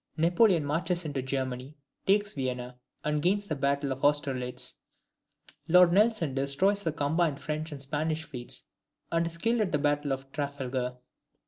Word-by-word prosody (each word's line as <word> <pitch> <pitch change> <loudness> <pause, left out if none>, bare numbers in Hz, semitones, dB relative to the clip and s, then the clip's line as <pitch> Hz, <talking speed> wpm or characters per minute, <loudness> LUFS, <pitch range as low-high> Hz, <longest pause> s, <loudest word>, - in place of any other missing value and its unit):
Napoleon 170 0 +4
marches 170 +4 -1
into 145 -3 -2
Germany, 130 +1 -3 0.3
takes 205 +1 +3
Vienna, 125 -2 -4 0.2
and 150 0 0
gains 200 +5 +2
the 155 - -1
battle 140 0 0
of 135 0 -5
Austerlitz. 135 -4 0 0.9
Lord 180 0 +6
Nelson 205 - +3
destroys 145 +10 +1
the 165 - 0
combined 155 0 0
French 155 +3 -4
and 140 -2 -4
Spanish 155 +3 -1
fleets, 125 -6 -7 0.5
and 165 0 +2
is 170 0 -4
killed 230 +5 +2
at 200 - 0
the - - +2
battle 145 0 0
of 135 0 -4
Trafalgar. 130 -3 -3
145 Hz, 150 wpm, -29 LUFS, 135-170 Hz, 0.9 s, Lord